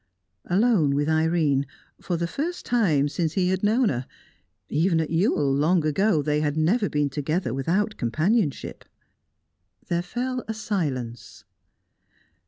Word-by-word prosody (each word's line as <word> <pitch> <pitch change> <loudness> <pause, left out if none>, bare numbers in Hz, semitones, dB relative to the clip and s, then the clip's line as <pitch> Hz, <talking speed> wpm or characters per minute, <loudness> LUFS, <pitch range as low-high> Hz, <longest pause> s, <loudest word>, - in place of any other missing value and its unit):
Alone 185 - +2
with 145 +1 0
Irene, 160 -3 +1 0.3
for 175 - -2
the 170 - -1
first 320 - -4
time 170 - +2
since 160 +2 -2
he 180 -2 +1
had 190 0 0
known 220 +3 +3
her; 125 -1 -3 0.6
even 165 +3 +1
at 160 - -2
Ewell, 165 -5 +2
long 155 +4 +2
ago, 160 +1 +2
they 150 0 0
had 150 0 -1
never 200 +7 +2
been 150 -1 +1
together 145 0 -2
without 185 - -1
companionship. 155 - -1 1.1
There 170 -1 +1
fell 250 +7 -3
a 220 - -3
silence. 140 - -4
165 Hz, 135 wpm, -25 LUFS, 145-205 Hz, 1.1 s, known